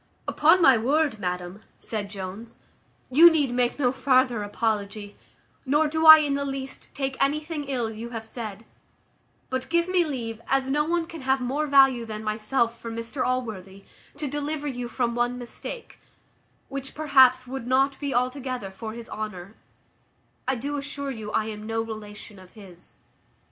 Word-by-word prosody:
"Upon 330 +4 +4
my 260 -6 +7
word, 280 0 +1
madam," 180 +1 -4 0.2
said 210 -3 -5
Jones, 200 +3 -8 0.5
"you 325 +6 +9
need 295 -6 +1
make 245 0 0
no 255 -4 +2
farther 255 -3 +2
apology; 205 -1 -3 0.5
nor 295 +3 +2
do 320 +1 +1
I 315 0 +13
in 295 -2 0
the 280 0 -1
least 270 -1 -6
take 270 -1 -2
anything 300 +2 -2
ill 245 -5 -2
you 225 +2 -7
have 225 -2 -6
said; 220 -2 -7 0.9
but 260 0 -3
give 340 0 +2
me 365 -1 +3
leave, 235 -7 -5
as 270 0 +1
no 295 +1 +2
one 340 +1 0
can 325 -2 -9
have 265 +1 +1
more 275 +5 -1
value 270 -4 +5
than 215 -1 -6
myself 230 +2 -1
for 230 - -6
Mr 230 +3 -4
Allworthy, 200 -7 -3 0.3
to 295 0 -3
deliver 295 +1 -3
you 245 -4 -3
from 240 -1 -1
one 240 +1 0
mistake, 250 - -8 0.7
which, 275 0 -6
perhaps, 260 -4 +5
would 255 -1 -6
not 270 +2 +2
be 285 -2 -3
altogether 255 -4 -2
for 220 +3 -7
his 235 0 -9
honour; 210 -2 -6 0.9
I 265 - +2
do 285 +4 -3
assure 280 0 -4
you, 220 -4 -6
I 220 - +1
am 215 -1 -7
no 225 0 -1
relation 210 -2 -9
of 185 -1 -16
his." 185 -5 -13
250 Hz, 165 wpm, -25 LUFS, 220-280 Hz, 0.9 s, I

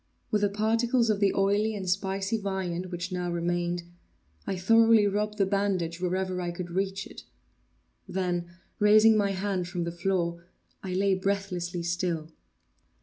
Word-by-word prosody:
With 210 - +2
the 205 - +3
particles 230 +3 +2
of 205 - -1
the 200 -2 +3
oily 205 +3 +2
and 190 -2 -5
spicy 195 +3 -1
viand 185 -3 -3
which 180 +1 -5
now 180 -1 -2
remained, 175 0 -1 0.6
I 195 - -1
thoroughly 225 +3 +5
rubbed 210 +1 -1
the 195 - +3
bandage 190 -4 -1
wherever 185 0 -1
I 175 - -2
could 175 0 -6
reach 195 +1 -2
it; - - -11 0.9
then, 180 -2 -2 0.3
raising 215 +1 +6
my 205 -2 +2
hand 190 -2 -2
from 175 -1 -3
the 170 - -3
floor, 170 -1 -1 0.4
I 185 -1 -4
lay 195 +1 +2
breathlessly 185 -3 -2
still. 170 -2 -2
190 Hz, 150 wpm, -28 LUFS, 175-205 Hz, 0.9 s, raising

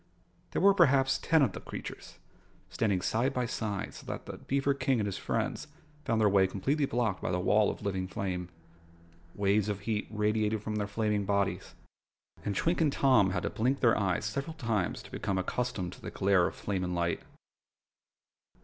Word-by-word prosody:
There - - -1
were 200 0 +7
perhaps 135 -7 +4
ten 160 -3 +3
of 120 - +2
the - - -7
creatures, - - -8 0.5
standing 100 -5 0
side 125 +5 0
by 125 -1 +1
side 105 -4 -3
so - - -11
that - - -5
the - - -8
beaver 140 +1 +1
King 135 -1 +1
and 105 - 0
his 100 -2 -3
friends - - -2 0.4
found 115 - +1
their 110 - +5
way 95 -1 +4
completely 140 +10 0
blocked 115 -6 -1
by - - -2
this 90 - 0
wall 105 +2 +4
of - - -6
living 95 -2 -2
flame. 90 -2 -3 0.9
Waves 100 +1 +2
of 100 -1 -3
heat 105 0 -2
radiated 105 0 0
from 105 0 -3
their 105 -1 -1
flaming 105 -1 0
bodies, 100 0 -1 0.7
and 100 - -2
Twink 170 +1 +1
and 150 -3 +3
Tom 130 -9 +4
had 95 - -2
to - - -1
blink 130 +5 0
their 115 -3 +5
eyes 95 -1 0
several 140 +9 -3
times 115 - -1
to - - -14
become 100 -2 -2
accustomed 95 -1 -2
to - - -14
the - - -5
glare 95 -3 +3
of - - -6
flame 95 -3 -2
and 90 0 -2
light. 85 0 0
105 Hz, 190 wpm, -30 LUFS, 100-125 Hz, 0.9 s, were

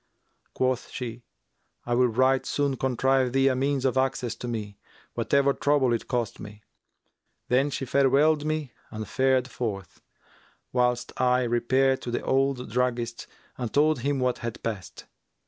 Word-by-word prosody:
Quoth 130 -1 0
she, 120 -1 -6 0.6
'I 120 - -1
will 125 +1 +4
right 130 +3 +2
soon 140 -2 0
contrive 130 0 +1
thee 135 0 +4
a 130 - +1
means 135 0 0
of 130 0 +1
access 130 -3 -1
to 120 - -7
me, 105 -4 -5 0.3
whatever 140 0 +2
trouble 140 -4 +2
it 115 - -3
cost 120 -3 -2
me.' 105 0 -10 0.9
Then 135 +3 +3
she 135 - -3
farewelled 140 +4 +3
me 155 -4 -2 0.2
and 110 -1 -6
fared 130 -1 +2
forth, 105 -8 -5 0.7
whilst 125 -1 +1
I 125 0 +3
repaired 130 +3 +2
to - - -5
the 120 - -2
old 135 -3 0
druggist 120 -1 -1 0.3
and 120 -3 -3
told 150 -1 +3
him 140 +2 -1
what 125 -1 0
had 115 -1 -6
passed. 105 -5 -5
125 Hz, 150 wpm, -26 LUFS, 120-135 Hz, 0.9 s, will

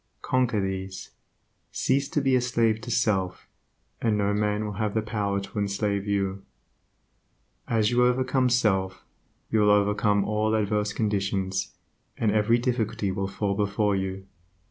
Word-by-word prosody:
Conquer 125 -4 +1
these; 95 -1 -4 0.6
cease 140 +2 0
to 150 - 0
be 135 -1 +3
a 125 - +3
slave 115 -3 +1
to 115 - -8
self, 100 -6 0 0.5
and 110 -3 +1
no 100 0 +1
man 105 0 0
will 105 - -4
have 105 -1 -1
the 110 - +2
power 100 -2 -1
to 100 +2 -6
enslave 100 0 -1
you. 100 -1 -1 1.3
As 110 -2 +2
you 120 0 +3
overcome 130 +1 +1
self, 95 -6 +1 0.5
you 110 - +3
will 105 0 +4
overcome 105 0 +3
all 110 +1 +1
adverse 105 -1 0
conditions, 100 -3 -1 0.4
and 110 -2 +1
every 110 +2 +3
difficulty 115 -5 -1
will 95 0 -2
fall 100 +1 -2
before 105 0 +1
you. 95 0 -3
105 Hz, 145 wpm, -26 LUFS, 100-115 Hz, 1.3 s, will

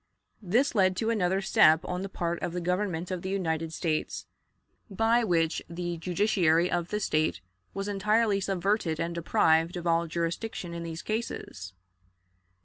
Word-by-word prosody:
This 230 +9 +1
led 185 -4 +3
to 225 +2 0
another 190 -3 +1
step 160 -4 +5
on 180 0 -3
the 195 - -4
part 170 -2 -3
of 170 - -3
the 180 - -2
Government 180 0 -2
of 180 -2 -3
the 190 - -4
United 165 -4 -1
States, 160 -1 -2 0.6
by 225 +4 +2
which 165 -5 +1
the 175 0 -4
judiciary 175 -1 +2
of 175 -1 -1
the 210 - -1
State 155 - 0 0.4
was 195 0 -3
entirely 210 +1 +2
subverted 190 -3 0
and 170 +1 -2
deprived 165 0 +2
of 175 - -6
all 170 0 +2
jurisdiction 170 +3 -3
in 170 - -5
these 165 0 -6
cases. 110 - -5
180 Hz, 155 wpm, -28 LUFS, 165-200 Hz, 0.6 s, step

